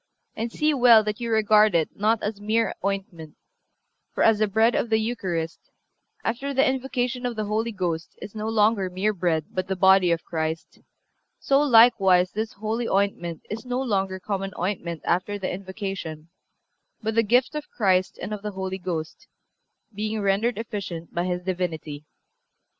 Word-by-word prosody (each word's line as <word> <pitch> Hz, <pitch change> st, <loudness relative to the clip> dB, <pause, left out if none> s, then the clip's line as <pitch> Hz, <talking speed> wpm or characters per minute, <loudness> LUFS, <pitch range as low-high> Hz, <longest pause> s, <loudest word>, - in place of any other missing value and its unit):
And 230 Hz, +1 st, -3 dB
see 305 Hz, +4 st, +1 dB
well 240 Hz, -5 st, +6 dB
that 210 Hz, +1 st, -3 dB
you 235 Hz, -, -2 dB
regard 215 Hz, -2 st, +4 dB
it 160 Hz, -2 st, +2 dB
not 215 Hz, +2 st, +1 dB
as 205 Hz, -1 st, -3 dB
mere 220 Hz, +2 st, +1 dB
ointment; 190 Hz, -6 st, -4 dB, 0.8 s
for, -, -, +2 dB
as 225 Hz, -2 st, +4 dB
the 215 Hz, -, +3 dB
bread 220 Hz, +4 st, +3 dB
of 235 Hz, -, 0 dB
the 220 Hz, -, +3 dB
Eucharist, 185 Hz, -8 st, -3 dB, 0.5 s
after 270 Hz, +5 st, -2 dB
the 270 Hz, -, +4 dB
invocation 260 Hz, -1 st, -1 dB
of 245 Hz, -1 st, -2 dB
the 215 Hz, -1 st, -2 dB
Holy 220 Hz, +3 st, -1 dB
Ghost, 175 Hz, -5 st, -3 dB
is 200 Hz, -, -9 dB
no 215 Hz, 0 st, -3 dB
longer 210 Hz, -3 st, +2 dB
mere 190 Hz, +4 st, 0 dB
bread 170 Hz, -5 st, 0 dB
but 185 Hz, 0 st, -3 dB
the 190 Hz, -, -1 dB
body 190 Hz, -1 st, +5 dB
of 170 Hz, -1 st, 0 dB
Christ, 160 Hz, 0 st, -4 dB, 0.6 s
so 275 Hz, 0 st, +3 dB
likewise 225 Hz, -9 st, +5 dB
this 220 Hz, +1 st, -3 dB
holy 220 Hz, +3 st, -3 dB
ointment 190 Hz, -4 st, -1 dB
is 220 Hz, +2 st, -6 dB
no 250 Hz, 0 st, -2 dB
longer 195 Hz, -7 st, -1 dB
common 195 Hz, 0 st, -3 dB
ointment 170 Hz, -3 st, -3 dB
after 190 Hz, +4 st, 0 dB
the 190 Hz, -2 st, -3 dB
invocation, 190 Hz, -4 st, -6 dB, 0.7 s
but 220 Hz, +1 st, -1 dB
the 230 Hz, -, +4 dB
gift 245 Hz, +6 st, +2 dB
of 300 Hz, -1 st, -5 dB
Christ 185 Hz, -4 st, +1 dB
and 215 Hz, -, -5 dB
of 210 Hz, -, -5 dB
the 210 Hz, 0 st, -5 dB
Holy 190 Hz, 0 st, -4 dB
Ghost, 165 Hz, -3 st, -5 dB, 0.7 s
being 215 Hz, +2 st, -3 dB
rendered 205 Hz, +3 st, +1 dB
efficient 200 Hz, -7 st, -6 dB
by 175 Hz, +1 st, -1 dB
His 180 Hz, 0 st, -2 dB
Divinity. 165 Hz, -5 st, -4 dB
205 Hz, 170 wpm, -25 LUFS, 185-225 Hz, 0.8 s, well